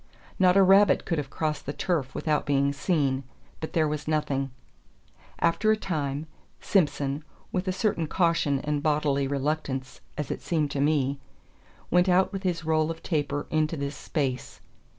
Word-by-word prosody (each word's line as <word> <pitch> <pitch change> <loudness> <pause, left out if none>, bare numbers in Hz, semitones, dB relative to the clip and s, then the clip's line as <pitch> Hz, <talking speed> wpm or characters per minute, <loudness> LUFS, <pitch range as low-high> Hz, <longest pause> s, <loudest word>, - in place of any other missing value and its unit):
Not 185 0 +5
a 195 - +7
rabbit 195 +2 +5
could 165 -4 0
have 140 -2 -4
crossed 155 -1 -3
the 145 - -2
turf 150 -4 -1
without 150 -2 0
being 140 0 +2
seen; 140 -4 0 0.4
but 160 - -6
there 160 -2 +3
was 150 0 -4
nothing. 140 -3 0 0.9
After 205 +6 +2
a 220 - +3
time, 150 -6 -2 0.3
Simson, 145 -5 +1 0.3
with 185 +1 -2
a - - +2
certain 185 -4 0
caution 165 -5 +2
and 150 0 -1
bodily 145 -2 +1
reluctance, 140 -1 -2 0.2
as 150 -4 -3
it - - -4
seemed 155 -4 0
to 140 - -1
me, 140 -2 +1 0.7
went 180 +2 +4
out 185 +3 +3
with 195 - -3
his 175 -4 -2
roll 155 0 +2
of 165 0 -6
taper 145 -3 -1
into 155 +1 +1
this 140 0 -3
space. 130 -5 -3
150 Hz, 165 wpm, -27 LUFS, 140-170 Hz, 0.9 s, a